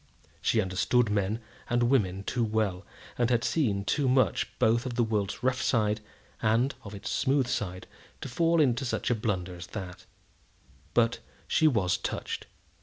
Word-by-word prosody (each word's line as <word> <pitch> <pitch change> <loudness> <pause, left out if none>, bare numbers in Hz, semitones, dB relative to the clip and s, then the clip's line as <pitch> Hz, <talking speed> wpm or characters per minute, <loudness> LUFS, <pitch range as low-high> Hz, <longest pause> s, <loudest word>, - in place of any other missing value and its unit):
She 115 - +2
understood 105 +5 +1
men 105 +2 0 0.3
and 120 0 +2
women 100 -7 +2
too 120 +3 -1
well, 105 -4 0 0.4
and 120 -1 +3
had 120 -2 +2
seen 105 -11 +1
too 135 +7 +1
much 130 -7 +2
both 115 +3 +2
of 120 - -4
the 120 - +3
world's 105 -1 -2
rough 130 0 +1
side 105 -2 +1 0.4
and 115 +5 +2
of 100 0 -8
its 105 +2 -5
smooth 135 +5 +2
side 95 -6 -3 0.4
to - - -4
fall 165 +6 +2
into 130 -3 +3
such 125 - -1
a - - +3
blunder 95 -5 -2
as 90 0 -8
that; 95 -1 -8 0.9
but 115 0 +3 0.3
she 160 - +4
was 95 -10 +2
touched. - - -4
110 Hz, 165 wpm, -29 LUFS, 100-125 Hz, 0.9 s, she